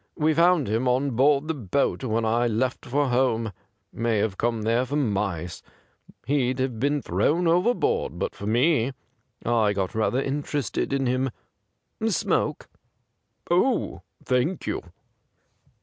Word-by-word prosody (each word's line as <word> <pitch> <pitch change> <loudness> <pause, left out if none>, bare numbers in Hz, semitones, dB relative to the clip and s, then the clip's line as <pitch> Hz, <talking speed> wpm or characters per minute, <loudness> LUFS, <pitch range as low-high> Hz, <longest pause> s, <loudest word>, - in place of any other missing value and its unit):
We 155 -1 +2
found 170 -2 +4
him 115 +5 0
on 130 +3 +1
board 140 +4 +3
the 160 - 0
boat 135 - -1
when 115 -2 0
I 120 +2 +2
left 120 +3 -1
for 140 +2 +1
home 120 -3 +1 0.2
— - - -48
may 115 -1 0
have 100 -1 0
come 115 +1 -1
there 115 +2 +2
after 130 +3 -2
mice. 100 - -1 0.6
He'd 130 -1 +1
have 130 -4 -2
been 145 +2 0
thrown 170 +3 +1
overboard 180 +9 +1
but - - -2
for 100 - -7
me. 125 +2 +2 0.5
I 110 -3 +2
got 95 -2 -2
rather 110 +3 +1
interested 140 -3 -2
in 135 -1 0
him. 130 +1 +1 0.8
Smoke - - 0 0.3
.''' - - -49
' - - -15
Oh, 225 +8 +1 0.2
thank 130 +8 0
you.' - - -2
130 Hz, 150 wpm, -25 LUFS, 115-145 Hz, 0.8 s, found